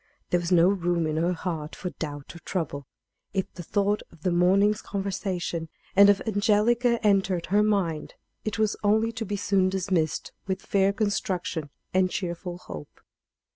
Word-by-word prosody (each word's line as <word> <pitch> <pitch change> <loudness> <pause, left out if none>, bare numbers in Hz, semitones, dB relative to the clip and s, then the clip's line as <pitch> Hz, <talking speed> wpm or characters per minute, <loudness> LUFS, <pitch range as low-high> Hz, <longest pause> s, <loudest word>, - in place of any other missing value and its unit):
There 175 - +4
was 175 +1 -3
no 175 -1 +6
room 175 -3 +1
in 155 0 -1
her 170 +3 +2
heart 160 -3 -4
for 180 - -5
doubt 145 -1 -6
or - - -9
trouble. 145 -6 -4 0.5
If 190 - -1
the 180 - -7
thought 205 +4 0
of 165 -2 -19
the 185 - +2
morning's 195 +5 +3
conversation 185 -4 -3 0.3
and 200 +1 +8
of 205 - +3
Angelica 225 +3 +3
entered 195 -4 +2
her 205 +2 +3
mind, 195 -7 0 0.3
it 215 0 -2
was 215 -1 +1
only 220 +2 +3
to 225 0 -4
be 205 +1 -2
soon 195 -1 +2
dismissed 185 -4 -1 0.2
with 190 0 -2
fair 195 0 +2
construction 185 -6 -2 0.2
and 185 0 +3
cheerful 175 -1 -4
hope. 75 - -10
190 Hz, 165 wpm, -26 LUFS, 170-205 Hz, 0.5 s, and